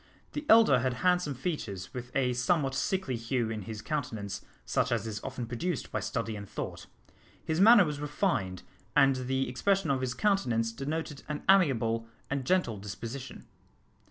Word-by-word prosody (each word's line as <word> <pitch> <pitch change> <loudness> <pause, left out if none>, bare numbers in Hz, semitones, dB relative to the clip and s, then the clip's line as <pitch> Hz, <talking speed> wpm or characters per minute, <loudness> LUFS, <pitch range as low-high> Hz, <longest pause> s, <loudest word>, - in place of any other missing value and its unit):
The 295 0 -5
elder 220 - +7
had 125 +1 0
handsome 180 -6 +2
features, 125 - -4
with 125 -1 -6
a 125 -2 +2
somewhat 135 +3 +1
sickly 185 -3 -1
hue 115 0 -1
in 110 -1 -3
his 105 +1 -7
countenance, 110 -10 -3 0.2
such - - 0
as - - 0
is 105 -2 -5
often 130 -2 -4
produced 130 +7 -3
by - - -1
study 115 -2 -3
and 100 -1 -8
thought. - - -6 0.6
His 160 +2 0
manner 220 -1 +8
was 150 -2 -3
refined, 145 - -1 0.3
and 135 -2 +5
the 130 0 0
expression 195 +8 +1
of 135 -1 0
his 125 -1 -2
countenance 120 - +1
denoted 145 +4 -4
an 150 -1 -3
amiable 115 - +3 0.2
and 140 -2 -1
gentle 155 - +1
disposition. 115 +6 -7
130 Hz, 160 wpm, -30 LUFS, 115-160 Hz, 0.6 s, manner